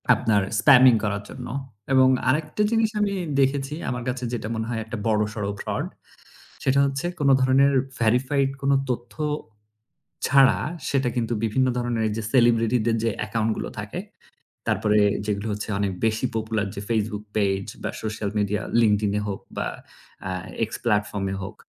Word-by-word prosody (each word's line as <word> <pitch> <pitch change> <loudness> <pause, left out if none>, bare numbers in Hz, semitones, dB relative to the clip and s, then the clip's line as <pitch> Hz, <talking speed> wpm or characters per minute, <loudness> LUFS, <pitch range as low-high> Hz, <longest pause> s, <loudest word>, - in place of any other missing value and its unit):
আপনার 105 -3 +2 0.2
spamming 130 0 +7
করার 100 -1 -1
জন্য 125 -1 -8 0.5
এবং 130 0 +6 0.2
আরেকটা 155 +7 0
জিনিস 225 -1 +3
আমি 200 -1 +1 0.3
দেখেছি 135 +1 +1 0.2
আমার 125 -1 -3
কাছে 125 0 -3
যেটা 115 -3 -3
মনে 110 0 -2
হয় 115 -2 -2
একটা 115 +1 -6
বড়সড় 105 -1 0
fraud, - - -2 0.8
সেটা 135 +1 +3
হচ্ছে 135 +3 -2
কোন 140 - +3
ধরনের 135 +2 +4 0.3
verified 130 +4 +2
কোন 140 0 +2 0.2
তথ্য 120 -1 -4 1.1
ছাড়া 135 0 +5 0.3
সেটা 135 -2 +1
কিন্তু 120 -1 -1
বিভিন্ন 120 +4 +2
ধরনের 120 -2 -1
এইযে 110 +1 -3
celebrity 120 -1 +4
দের 115 -1 +2
যে 115 - +2 0.2
account 110 +1 0
গুলো - - -4
থাকে - - -5 0.7
তারপরে 105 0 +2 0.3
যেগুলো 105 +1 -2
হচ্ছে 105 +1 -5
অনেক 100 -1 0
বেশি 110 +2 +1
popular 110 -1 -1
যে 100 - -5
Facebook 105 -2 -1
page 95 -2 0
বা - - -1
social 105 -1 -3
media 105 0 0 0.2
LinkedIn 105 -2 +2
এ - - -3
হোক 100 - -3 0.2
বা - - -1 1.0
এ - - +3
X - - -20
platform 105 -3 0
এ - - -3
হোক, 95 +3 -7
115 Hz, 160 wpm, -24 LUFS, 105-130 Hz, 1.1 s, spamming